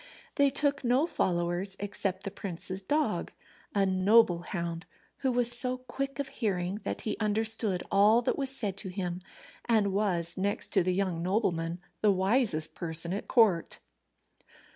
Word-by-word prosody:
They 280 Hz, -1 st, +3 dB
took 285 Hz, 0 st, 0 dB
no 250 Hz, +5 st, +2 dB
followers, 180 Hz, -, -2 dB
except 195 Hz, -1 st, -2 dB
the 200 Hz, -, -5 dB
prince's 190 Hz, -1 st, -5 dB
dog, 295 Hz, +10 st, -1 dB, 0.4 s
a 200 Hz, -1 st, +3 dB
noble 190 Hz, 0 st, +3 dB
hound, 170 Hz, -1 st, -5 dB, 0.3 s
who 265 Hz, -2 st, -1 dB
was 240 Hz, -1 st, +6 dB
so 250 Hz, +1 st, +5 dB
quick 275 Hz, +2 st, -6 dB
of 280 Hz, -2 st, -4 dB
hearing 200 Hz, -6 st, -3 dB
that -, -, -4 dB
he 215 Hz, -, -3 dB
understood 215 Hz, -2 st, +2 dB
all 210 Hz, +4 st, +4 dB
that -, -, 0 dB
was 275 Hz, -2 st, -2 dB
said 215 Hz, -8 st, -1 dB
to 195 Hz, -1 st, -4 dB
him, 180 Hz, -1 st, -4 dB, 0.4 s
and 215 Hz, -4 st, +1 dB
was, 185 Hz, -4 st, 0 dB
next 200 Hz, +2 st, 0 dB
to 195 Hz, -, +2 dB
the 180 Hz, +1 st, 0 dB
young 185 Hz, -4 st, -1 dB
nobleman, 175 Hz, -3 st, -1 dB, 0.2 s
the 210 Hz, -, +3 dB
wisest 190 Hz, -4 st, +1 dB
person 170 Hz, 0 st, -1 dB
at 200 Hz, -, -5 dB
court. 210 Hz, -9 st, +2 dB
200 Hz, 155 wpm, -29 LUFS, 180-235 Hz, 0.4 s, was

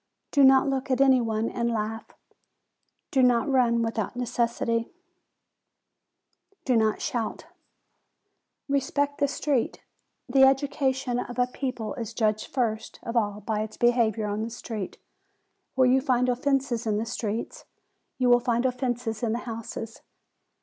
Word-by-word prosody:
Do 285 Hz, -, +4 dB
not 265 Hz, +1 st, +6 dB
look 270 Hz, 0 st, -2 dB
at 260 Hz, -1 st, +1 dB
any 265 Hz, -2 st, +5 dB
one 225 Hz, -1 st, -1 dB
and 235 Hz, -1 st, -1 dB
laugh; 225 Hz, 0 st, -3 dB, 1.0 s
do 265 Hz, -, +3 dB
not 245 Hz, -2 st, +3 dB
run 240 Hz, -4 st, +3 dB
without 225 Hz, -1 st, -2 dB
necessity; 235 Hz, -1 st, -1 dB, 1.7 s
do 255 Hz, -, +2 dB
not 220 Hz, -1 st, +1 dB
shout. 230 Hz, -3 st, -3 dB, 1.2 s
Respect 285 Hz, +1 st, 0 dB
the 285 Hz, -, +3 dB
street. 275 Hz, -3 st, -1 dB, 0.4 s
The 265 Hz, +2 st, +3 dB
education 265 Hz, -2 st, +2 dB
of 245 Hz, 0 st, -6 dB
a 250 Hz, -, +3 dB
people 250 Hz, -3 st, -4 dB
is 230 Hz, -1 st, -6 dB
judged 215 Hz, -1 st, 0 dB
first 220 Hz, -4 st, -2 dB
of 230 Hz, -, -5 dB
all 210 Hz, -2 st, 0 dB
by 215 Hz, +1 st, -2 dB
their 215 Hz, -, -16 dB
behavior 235 Hz, -3 st, +2 dB
on 205 Hz, +1 st, -2 dB
the 225 Hz, -, -3 dB
street. 225 Hz, -4 st, -6 dB, 0.8 s
Where 260 Hz, -, +4 dB
you 260 Hz, +1 st, +4 dB
find 255 Hz, -2 st, +2 dB
offences 255 Hz, -2 st, 0 dB
in 210 Hz, -1 st, +1 dB
the 220 Hz, -, -1 dB
streets, 225 Hz, -1 st, -4 dB, 0.5 s
you 255 Hz, -, +1 dB
will 245 Hz, 0 st, +6 dB
find 240 Hz, 0 st, 0 dB
offences 245 Hz, -3 st, -2 dB
in 225 Hz, -2 st, 0 dB
the 235 Hz, -, -1 dB
houses. 225 Hz, -1 st, -6 dB
240 Hz, 145 wpm, -26 LUFS, 225-260 Hz, 1.7 s, not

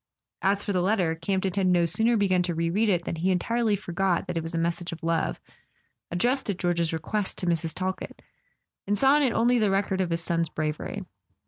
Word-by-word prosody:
As 200 Hz, +1 st, +1 dB
for 205 Hz, -, -2 dB
the 180 Hz, -, +1 dB
letter, 185 Hz, -4 st, +1 dB
Campton 190 Hz, +3 st, -1 dB
had 195 Hz, -2 st, +1 dB
no 175 Hz, -1 st, +4 dB
sooner 220 Hz, +8 st, +2 dB
begun 190 Hz, -3 st, +2 dB
to 175 Hz, -1 st, -2 dB
re 165 Hz, 0 st, 0 dB
read 215 Hz, +4 st, +2 dB
it 175 Hz, -3 st, +1 dB
than 165 Hz, -, -3 dB
he 175 Hz, +4 st, 0 dB
entirely 220 Hz, +4 st, +1 dB
forgot 185 Hz, -1 st, -1 dB
that 180 Hz, -, -5 dB
it 165 Hz, -, 0 dB
was 165 Hz, +1 st, -5 dB
a -, -, 0 dB
mes¬ 170 Hz, +1 st, +1 dB
sage 175 Hz, 0 st, -6 dB
of 165 Hz, -1 st, -8 dB
love, 165 Hz, 0 st, 0 dB, 0.7 s
addressed 245 Hz, +9 st, 0 dB
at 195 Hz, -, -1 dB
George's 170 Hz, -2 st, 0 dB
request 190 Hz, +5 st, -2 dB
to -, -, -4 dB
Mrs. 165 Hz, -2 st, 0 dB
Talkett, 185 Hz, 0 st, -4 dB, 0.6 s
and 205 Hz, +1 st, +1 dB
saw 270 Hz, +4 st, +5 dB
in -, -, +2 dB
it 265 Hz, -4 st, +3 dB
only 240 Hz, +2 st, +3 dB
the 210 Hz, -2 st, +2 dB
record 195 Hz, -1 st, 0 dB
of 180 Hz, -, -1 dB
his 165 Hz, 0 st, -1 dB
son's 165 Hz, -1 st, 0 dB
bravery. 155 Hz, -1 st, -4 dB
180 Hz, 225 wpm, -26 LUFS, 170-205 Hz, 0.7 s, saw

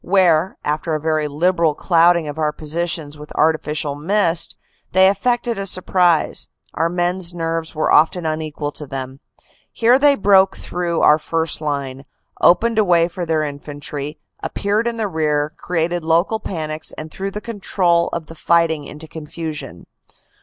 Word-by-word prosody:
Where, 180 Hz, -2 st, +3 dB
after 155 Hz, +2 st, -1 dB
a -, -, -1 dB
very 155 Hz, 0 st, 0 dB
liberal 165 Hz, +1 st, +1 dB
clouding 170 Hz, -1 st, +3 dB
of 145 Hz, +2 st, -6 dB
our 155 Hz, -1 st, +1 dB
positions 155 Hz, -1 st, -4 dB
with 150 Hz, -, -11 dB
artificial 155 Hz, -2 st, 0 dB
mist, 170 Hz, +2 st, 0 dB, 0.4 s
they 190 Hz, +1 st, +6 dB
effected 235 Hz, +3 st, 0 dB
a 195 Hz, -, -2 dB
surprise, 180 Hz, -2 st, +2 dB, 0.2 s
our 165 Hz, +1 st, 0 dB
men 175 Hz, +1 st, 0 dB
s 175 Hz, -2 st, -1 dB
nerves 165 Hz, -1 st, -3 dB
were 155 Hz, -, +1 dB
often 165 Hz, +3 st, +4 dB
unequal 155 Hz, -2 st, -3 dB
to 150 Hz, 0 st, -8 dB
them. 130 Hz, 0 st, -6 dB, 0.5 s
Here 240 Hz, +3 st, +4 dB
they 285 Hz, 0 st, +5 dB
broke 195 Hz, -3 st, +4 dB
through 175 Hz, -2 st, -2 dB
our 150 Hz, +1 st, +5 dB
first 160 Hz, 0 st, -2 dB
line, 140 Hz, -3 st, -3 dB, 0.4 s
opened 225 Hz, +5 st, +4 dB
a -, -, +5 dB
way 170 Hz, -3 st, +3 dB
for 175 Hz, -1 st, -5 dB
their 160 Hz, -1 st, +1 dB
infantry, 145 Hz, 0 st, -6 dB, 0.2 s
ap -, -, -6 dB
peared 210 Hz, +3 st, 0 dB
in 235 Hz, -1 st, -2 dB
the 220 Hz, -2 st, -1 dB
rear, 150 Hz, -3 st, 0 dB
created 175 Hz, 0 st, -1 dB
local 170 Hz, +7 st, +2 dB
panics, 155 Hz, -5 st, -4 dB
and 155 Hz, 0 st, -7 dB
threw 195 Hz, +4 st, -4 dB
the 205 Hz, -, -5 dB
control 190 Hz, -6 st, +1 dB
of 170 Hz, -2 st, -4 dB
the 165 Hz, -, -11 dB
fighting 165 Hz, -2 st, +1 dB
into 150 Hz, +3 st, -8 dB
confusion. 155 Hz, -, -7 dB
165 Hz, 160 wpm, -19 LUFS, 150-180 Hz, 0.5 s, they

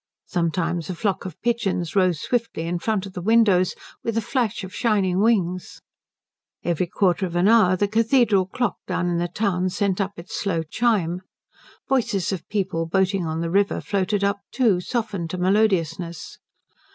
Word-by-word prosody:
Sometimes 170 Hz, -1 st, -1 dB
a 185 Hz, -, -3 dB
flock 200 Hz, +2 st, -1 dB
of 185 Hz, -4 st, -7 dB
pigeons 205 Hz, -8 st, -1 dB
rose 185 Hz, -5 st, +3 dB
swiftly 230 Hz, -6 st, -2 dB
in 175 Hz, +1 st, -2 dB
front 205 Hz, +1 st, -1 dB
of 195 Hz, -, -10 dB
the 180 Hz, -, -5 dB
windows, 200 Hz, -3 st, +3 dB, 0.3 s
with 230 Hz, -1 st, -2 dB
a -, -, +4 dB
flash 230 Hz, -3 st, -1 dB
of 190 Hz, -, -8 dB
shining 195 Hz, -6 st, +1 dB
wings. 185 Hz, -5 st, +1 dB, 0.8 s
Every 175 Hz, +1 st, 0 dB
quarter 185 Hz, +1 st, +1 dB
of 175 Hz, -, -8 dB
an 175 Hz, +3 st, +3 dB
hour 215 Hz, -5 st, +5 dB
the 205 Hz, +2 st, +1 dB
cathedral 225 Hz, -3 st, +3 dB
clock 245 Hz, +5 st, -1 dB
down 175 Hz, -1 st, -1 dB
in 170 Hz, -1 st, 0 dB
the 175 Hz, -, 0 dB
town 185 Hz, -1 st, 0 dB
sent 200 Hz, 0 st, 0 dB
up 195 Hz, +1 st, -2 dB
its 170 Hz, +2 st, -10 dB
slow 170 Hz, -5 st, -1 dB
chime. 180 Hz, -1 st, 0 dB, 0.7 s
Voices 215 Hz, -9 st, 0 dB
of 185 Hz, -4 st, -5 dB
people 180 Hz, -5 st, -1 dB
boating 190 Hz, 0 st, +1 dB
on 160 Hz, +1 st, -2 dB
the 165 Hz, 0 st, -2 dB
river 200 Hz, +2 st, +2 dB
floated 200 Hz, 0 st, -1 dB
up 200 Hz, 0 st, +1 dB
too, 225 Hz, -9 st, +3 dB
softened 200 Hz, -6 st, -3 dB
to 185 Hz, -, -4 dB
melodiousness. 180 Hz, -4 st, 0 dB
190 Hz, 170 wpm, -23 LUFS, 175-215 Hz, 0.8 s, hour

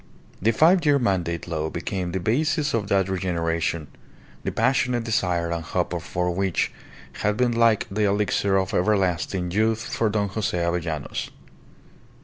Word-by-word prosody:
The 110 Hz, -, +3 dB
Five 170 Hz, -, +4 dB
Year 145 Hz, -2 st, +4 dB
Mandate 90 Hz, -9 st, -1 dB
law 80 Hz, -2 st, -2 dB
became 90 Hz, +2 st, -3 dB
the 95 Hz, -, -2 dB
basis 145 Hz, -, +1 dB
of 105 Hz, -4 st, 0 dB
that 95 Hz, -1 st, +2 dB
regeneration, 85 Hz, -4 st, -1 dB, 0.6 s
the -, -, -2 dB
passionate 125 Hz, -2 st, +1 dB
desire 90 Hz, -6 st, 0 dB
and 85 Hz, -1 st, -2 dB
hope -, -, -2 dB
for 90 Hz, 0 st, -2 dB
which 95 Hz, 0 st, 0 dB, 0.5 s
had 105 Hz, 0 st, +1 dB
been 125 Hz, -1 st, +2 dB
like 115 Hz, -2 st, +3 dB
the 105 Hz, +2 st, +1 dB
elixir 100 Hz, -1 st, +1 dB
of 95 Hz, 0 st, -1 dB
everlasting 90 Hz, -2 st, +1 dB
youth 110 Hz, +3 st, +1 dB
for 115 Hz, -, +1 dB
Don 105 Hz, -1 st, 0 dB
Jose 95 Hz, -2 st, -2 dB
Avellanos. 85 Hz, -3 st, -2 dB
95 Hz, 145 wpm, -24 LUFS, 85-110 Hz, 0.6 s, Five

